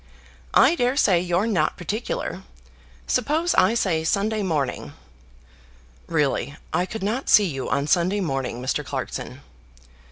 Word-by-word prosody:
I - - +6
daresay 245 - +2
you're 175 +3 0
not 180 -9 0
particular. 220 - -4 0.6
Suppose 310 +8 +1
I 230 - +4
say 170 -8 +1
Sunday 210 +6 0
morning." 155 -9 -2 1.1
"Really, 145 -3 0 0.2
I 175 +3 +1
could 220 0 -6
not 230 +7 -2
see 210 - +7
you 135 -7 -4
on 140 0 0
Sunday 180 +6 +2
morning, 135 -8 -2
Mr. 130 - -1
Clarkson." - - -5
185 Hz, 125 wpm, -23 LUFS, 155-220 Hz, 1.1 s, see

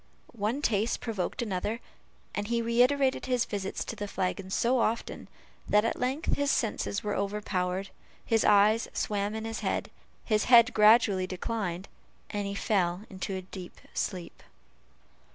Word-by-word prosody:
One 230 +6 -2
taste 215 -1 +1
provoked 220 0 -3
another; 210 +2 -2 0.5
and 205 0 -3
he 235 +1 +1
reiterated 250 +4 +2
his 250 -2 +1
visits 195 -2 -4
to - - -5
the 205 - -4
flagon 190 0 -2
so 240 +6 +2
often, 230 0 -1 0.4
that 210 +1 +4
at - - -1
length 265 +5 0
his 285 0 +1
senses 215 -4 -1
were 210 -1 -1
overpowered, 195 -2 -2 0.4
his 225 -1 +2
eyes 210 +2 +5
swam 205 0 -1
in 220 0 -4
his 225 0 -4
head, - - -2 0.3
his 215 -2 +2
head 240 0 +7
gradually 210 -3 +5
declined, 190 -1 -3 0.4
and 205 -1 -2
he 200 - -4
fell 185 -2 0
into 190 0 -4
a 185 - -5
deep 180 -1 -10
sleep. 180 -4 -4
210 Hz, 150 wpm, -29 LUFS, 195-230 Hz, 0.5 s, head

